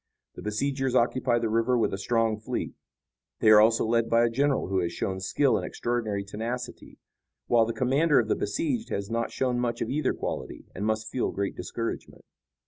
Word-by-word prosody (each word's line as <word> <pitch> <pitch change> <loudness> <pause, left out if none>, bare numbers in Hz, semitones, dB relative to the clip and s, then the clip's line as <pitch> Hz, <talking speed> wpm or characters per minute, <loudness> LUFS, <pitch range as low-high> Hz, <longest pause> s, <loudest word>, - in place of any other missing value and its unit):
The - - -10
besiegers 130 +4 -1
occupy 120 0 +2
the 115 -1 0
river 115 +3 +2
with 115 - +1
a - - -1
strong 115 0 +1
fleet. 110 - -4 0.7
They 110 - +5
are 105 0 +9
also 115 +1 +3
led 115 0 +1
by 115 0 +4
a 115 - 0
general 140 0 +1
who 95 0 0
has 85 -1 -1
shown 95 +2 -3
skill 135 +8 +2
and - - -3
extraordinary 110 -4 -2
tenacity, 115 +5 -6 0.5
while 115 -2 +3
the 115 - -2
commander 140 +5 +2
of 115 - 0
the - - +1
besieged 280 -8 -2
has 100 +2 -3
not 115 0 -1
shown 125 -2 0
much 120 -1 -1
of - - -2
either 150 +3 0
quality - - -5
and 100 +4 -3
must 110 0 -1
feel 130 - 0
great 100 0 -3
discouragement." 115 0 -5
115 Hz, 195 wpm, -27 LUFS, 110-125 Hz, 0.7 s, are